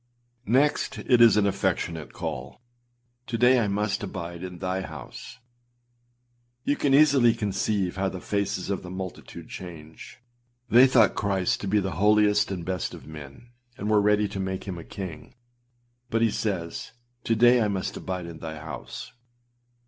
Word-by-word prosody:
â 120 0 -44
5. - - -3
Next, 145 +3 +2
it 125 -2 +3
is 115 -2 +7
an 105 - +4
affectionate 95 -5 -1
call. 65 +2 -6 0.7
âTo 120 - -2
day 125 +2 +5
I 110 - +1
must 105 +1 -1
abide 85 -3 -6
in 90 -1 -7
thy 95 +2 -2
house.â 125 +5 -9 1.3
You 145 - +1
can 140 -2 +2
easily 140 -5 +5
conceive 100 -2 -1
how 95 0 0
the 95 - -7
faces 100 -1 -2
of 100 - -2
the 90 - -9
multitude 95 -1 -7
change! 80 -3 -10 0.5
They 125 +3 +8
thought 115 -5 +4
Christ 95 -3 0
to 100 - -4
be 105 +2 +3
the 95 -5 -3
holiest 105 0 +4
and 90 -4 -4
best 90 -3 -3
of - - -13
men, 75 - -11 0.3
and 105 +2 -2
were 105 -1 +5
ready 105 0 +3
to 95 - -5
make 95 -1 -3
him 95 -3 -6
a - - -8
king. 95 -6 -8 0.7
But 115 -1 +1
he 115 - +3
says, 95 -3 -3 0.3
âTo 115 - +1
day 120 +1 +6
I 110 - +2
must 95 -2 -3
abide 90 -2 -4
in 85 -1 -9
thy 80 -1 -6
house. 75 -3 -8
100 Hz, 170 wpm, -26 LUFS, 90-115 Hz, 1.3 s, They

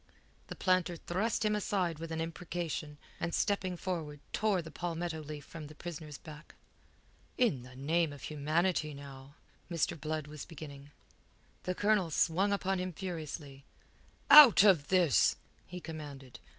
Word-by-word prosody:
The - - -7
planter 185 -2 +1
thrust 210 +7 -1
him 210 0 +2
aside 185 -6 -1
with 165 0 -6
an 160 - -3
imprecation, 165 -2 -4 0.2
and 170 - -2
stepping 185 -3 0
forward 165 -6 -4
tore 205 -5 +1
the 160 - -10
palmetto 170 -1 -3
leaf 150 -1 -8
from 155 -3 -9
the 155 - -13
prisoner's 155 -3 -7
back. 150 0 -12 0.8
"In 215 - +2
the 125 +1 -13
name 155 +4 +1
of 145 -2 -11
humanity, 155 +1 0
now...." 140 0 -11 0.3
Mr. 165 -2 -1
Blood 155 -1 -2
was 150 0 -8
beginning. 145 -3 -10 0.8
The 185 - -1
Colonel 205 -4 +2
swung 175 +6 +2
upon 195 -1 0
him 180 0 -3
furiously. 155 -6 -6 0.7
"Out 290 -9 +11
of 180 -8 +5
this!" 180 -7 +4 0.3
he 180 - -7
commanded. 145 -6 -9
165 Hz, 145 wpm, -32 LUFS, 150-185 Hz, 0.8 s, Out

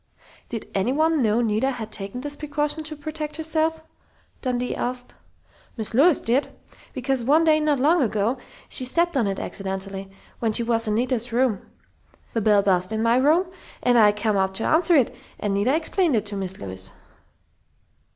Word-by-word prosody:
"Did 230 -3 -5
anyone 295 +10 +1
know 225 0 +2
Nita 225 +3 +1
had 230 -5 -5
taken 200 +4 -4
this 290 +1 -3
precaution 295 +1 -2
to 310 0 -5
protect 305 +1 -5
herself?" 320 0 0 0.6
Dundee 250 -1 -1
asked. 245 0 -3 0.6
"Mis' 220 0 -3
Lois 295 +7 +5
did, 250 +5 +1 0.5
because 260 -1 -1
one 300 +7 +4
day 310 -1 +4
not 300 -3 +1
long 315 +5 +3
ago 225 +1 0 0.3
she - - -1
stepped 340 +6 +2
on 240 -6 +2
it 195 -1 -2
accidentally, 195 0 -4 0.3
when 225 -2 0
she 235 - +2
was 230 -1 +1
in 210 - +1
Nita's 245 0 0
room. 235 -4 +1 0.7
The 225 - 0
bell 205 -1 +4
buzzed 185 0 +2
in 220 0 -1
my 230 +1 +3
room 325 +7 +3 0.3
and 245 -1 +3
I 215 -3 +6
come 210 0 -1
up 190 0 0
to 225 - -2
answer 335 +2 +3
it, 265 -6 +2 0.2
and 205 -1 -1
Nita 210 +8 +2
explained 330 -1 +1
it 220 - 0
to 205 -1 -4
Mis' 190 -1 -4
Lois." 95 -1 -5
245 Hz, 175 wpm, -23 LUFS, 210-295 Hz, 0.7 s, I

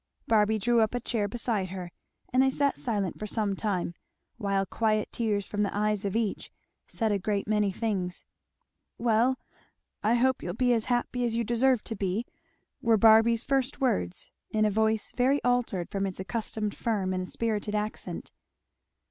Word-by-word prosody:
Barby 220 0 +3
drew 235 +3 +3
up 220 +2 +1
a - - 0
chair 225 -3 -1
beside 215 -3 -1
her, 180 -2 -6 0.4
and 255 - +5
they 265 - +4
sat 280 +1 +1
silent 205 -7 -2
for 215 - -4
some 210 -2 0
time, 190 -5 -1 0.4
while 195 -3 0
quiet 215 +2 0
tears 210 -4 -1
from 205 - -2
the 200 0 -1
eyes 210 -1 0
of 195 - -2
each 225 -3 -1 0.4
said 220 -2 0
a 200 - +1
great 200 +1 -1
many 210 -2 +2
things. 185 -4 -3 0.7
"Well, 235 +3 +2 0.6
I 220 +3 +3
hope 260 +2 +2
you'll 175 - -4
be 245 +1 +3
as 225 -2 +1
happy 245 0 0
as 235 -2 0
you 235 - +1
deserve 240 +1 +2
to 225 - -4
be," 195 +3 -1 0.6
were 225 -1 +4
Barby's 225 +2 +6
first 275 0 0
words, 90 - -1 0.2
in 215 0 +2
a 210 - +2
voice 220 +1 +1
very 265 +3 +3
altered 245 -8 0
from 195 0 -1
its 185 - -6
accustomed 210 +1 -3
firm 200 -5 -1
and 185 0 -3
spirited 215 -2 -2
accent. 210 +1 -4
220 Hz, 175 wpm, -28 LUFS, 200-235 Hz, 0.7 s, Barby's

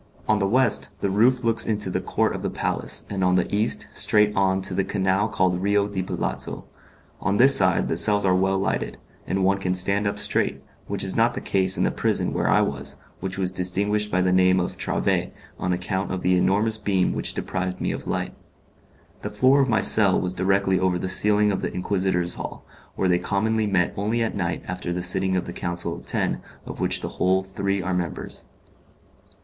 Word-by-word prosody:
On 110 -1 +2
the 95 - +1
west 125 +2 +1
the 100 - 0
roof 125 +5 +3
looks 115 0 +2
into 105 -3 0
the - - -2
court - - 0
of - - -5
the - - -2
palace, - - -2
and 95 -2 -3
on 90 0 +3
the 90 - +2
east 105 +2 +1
straight 105 -1 +3
on 95 -1 +2
to 95 - 0
the 95 +1 0
canal 95 +1 0
called 90 -1 0
Rio 100 +1 +1
di 100 -2 -3
Palazzo. 95 - -4 0.5
On 100 +1 0
this 135 +4 +8
side 95 -5 +3
the - - -1
cells 100 +4 +3
are 95 - +3
well 95 +1 +1
lighted, 95 - -2 0.3
and 95 0 -1
one 100 +1 +2
can 90 -1 -1
stand 100 +3 +1
up 100 - -2
straight, - - 0 0.2
which 100 -1 -2
is 95 -1 -1
not 115 +1 +2
the - - -3
case 95 -1 +1
in - - +1
the - - +1
prison - - -1
where - - 0
I - - +4
was, 70 0 -2 0.2
which 95 +1 -2
was 95 -2 -1
distinguished 100 +4 -1
by 90 -2 +1
the 90 - +1
name 95 0 +4
of 90 - -3
'Trave', - - -1 0.3
on 90 - -1
account 90 +2 -2
of 95 -1 -4
the 90 0 +3
enormous 105 +5 +1
beam 95 -3 0
which - - -1
deprived 95 -1 -3
me - - -1
of - - -6
light. - - -3 0.9
The 105 - -4
floor 130 +7 +3
of 135 - 0
my 110 - +2
cell 100 -4 +4
was 90 0 -2
directly 95 +1 +1
over 95 -1 +1
the 95 - -4
ceiling 105 +2 +4
of 95 - -2
the - - -3
Inquisitors' 90 -2 -1
hall, - - -8 0.3
where 95 - 0
they 90 -1 +2
commonly 110 +4 0
met 90 -3 +1
only 110 +4 -1
at 115 - -3
night 85 -4 -3
after 90 -1 -4
the 90 0 -2
sitting 95 +1 +2
of 90 - -2
the 85 - -7
Council 90 0 -3
of - - -11
Ten - - -1 0.2
of - - -8
which - - 0
the - - -7
whole 95 +1 +2
three 100 0 -3
are 90 +1 -2
members. 90 -2 -5
95 Hz, 215 wpm, -23 LUFS, 90-105 Hz, 0.9 s, this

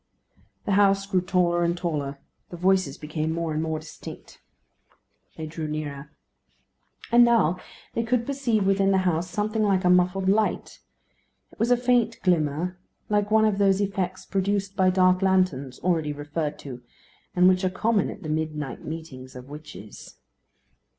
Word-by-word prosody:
The - - -1
house 195 0 +4
grew 190 -2 +1
taller 175 -1 +1
and 170 +1 0
taller. 150 -5 -3 0.3
The 175 - -8
voices 185 -5 +1
became 155 +1 -3
more 165 -1 -2
and 155 - -1
more 160 -1 -2
distinct. 155 0 -11 1.0
They 160 - -5
drew 155 0 -5
nearer. 150 -2 -5 1.0
And 240 +1 +7
now 220 -8 +3 0.3
they 230 - 0
could 235 0 0
perceive 245 -7 0
within 195 0 +3
the 190 -1 +2
house 175 0 0
something 215 +3 -1
like 195 -3 +2
a 180 - +5
muffled 180 +1 +2
light. 210 +2 0 0.7
It - - -20
was 230 - +1
a 245 - +5
faint 245 -2 +1
glimmer, 175 +1 0 0.3
like 205 -1 +1
one 220 0 +4
of 205 -2 +1
those 195 -1 +3
effects 190 -2 -2
produced 195 0 -1
by 185 -1 +3
dark 185 0 +3
lanterns, 185 -9 +1
already 160 -4 0
referred 145 +1 -4
to, 125 -3 -7 0.5
and 180 0 +5
which 185 0 +3
are 185 - +2
common 210 +2 +1
at 205 - -9
the - - -6
midnight 155 -4 -3
meetings 140 -5 -8
of 125 +1 -10
witches. 150 -8 -11
180 Hz, 160 wpm, -25 LUFS, 155-200 Hz, 1.0 s, And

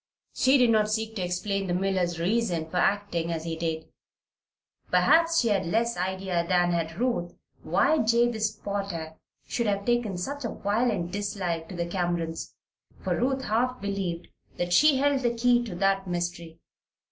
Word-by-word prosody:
She 265 +2 +4
did 245 -3 +4
not 215 -1 +3
seek 220 +1 -2
to 195 - -3
explain 195 +2 -2
the 175 - 0
miller's 180 -2 0
reason 180 -3 0
for 180 - -2
acting 175 -3 0
as 160 -1 -3
he 165 -1 -3
did. 160 -1 -3 1.0
Perhaps 330 0 +4
she 235 - +2
had 195 -4 +1
less 235 +6 +1
idea 185 -1 -1
than 175 -1 +3
had 165 -1 -2
Ruth 235 -9 -1 0.3
why 315 - +2
Jabez 230 -1 +2
Potter 200 -6 -5 0.3
should 235 -2 -1
have 200 -1 -1
taken 240 -6 0
such 280 +10 -4
a 235 - -2
violent 205 -5 -1
dislike 185 -5 -3
to 185 - -7
the 170 0 -2
Camerons. 170 -2 -3 0.5
For - - 0
Ruth 265 +2 0
half 250 +4 0
believed 195 -4 -3 0.3
that 175 0 -1
she 295 +7 +6
held 280 0 +2
the 240 -2 0
key 240 +1 +3
to 200 -7 -6
that 195 +1 +1
mystery. 175 -2 -4
195 Hz, 165 wpm, -27 LUFS, 175-235 Hz, 1.0 s, she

